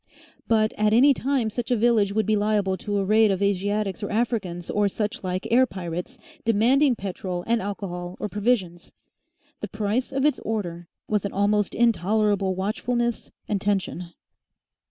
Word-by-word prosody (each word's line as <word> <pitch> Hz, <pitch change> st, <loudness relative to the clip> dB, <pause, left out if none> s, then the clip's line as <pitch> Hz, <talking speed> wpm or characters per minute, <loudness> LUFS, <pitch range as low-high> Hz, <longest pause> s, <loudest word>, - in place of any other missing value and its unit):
But 220 Hz, -1 st, +2 dB
at 210 Hz, 0 st, +3 dB
any 275 Hz, +5 st, +6 dB
time 260 Hz, -4 st, -1 dB
such 240 Hz, +1 st, -4 dB
a 250 Hz, -, +3 dB
village 220 Hz, -3 st, +3 dB
would 215 Hz, +1 st, 0 dB
be 215 Hz, -, +2 dB
liable 205 Hz, -2 st, +1 dB
to 205 Hz, +2 st, -3 dB
a 195 Hz, -, 0 dB
raid 215 Hz, +2 st, +4 dB
of 190 Hz, -2 st, 0 dB
Asiatics 200 Hz, +1 st, -1 dB
or 205 Hz, -, -3 dB
Africans 205 Hz, -6 st, -2 dB
or 205 Hz, -1 st, +2 dB
such 210 Hz, +4 st, -3 dB
like 185 Hz, 0 st, -3 dB
air 255 Hz, +2 st, +5 dB
pirates, 180 Hz, +5 st, -6 dB, 0.3 s
demanding 245 Hz, +5 st, +3 dB
petrol 185 Hz, -3 st, -5 dB
and 230 Hz, 0 st, +1 dB
alcohol 180 Hz, -3 st, -5 dB
or -, -, -2 dB
provisions. 200 Hz, -5 st, -1 dB, 0.7 s
The -, -, -4 dB
price 220 Hz, +5 st, -2 dB
of 270 Hz, +1 st, 0 dB
its 300 Hz, -, +2 dB
order 175 Hz, -6 st, -4 dB, 0.2 s
was 210 Hz, -2 st, 0 dB
an 200 Hz, -, -4 dB
almost 205 Hz, +1 st, +1 dB
intolerable 210 Hz, -3 st, +2 dB
watchfulness 235 Hz, +5 st, -2 dB, 0.2 s
and 205 Hz, -3 st, -1 dB
tension. 190 Hz, -4 st, -2 dB
210 Hz, 160 wpm, -24 LUFS, 190-230 Hz, 0.7 s, any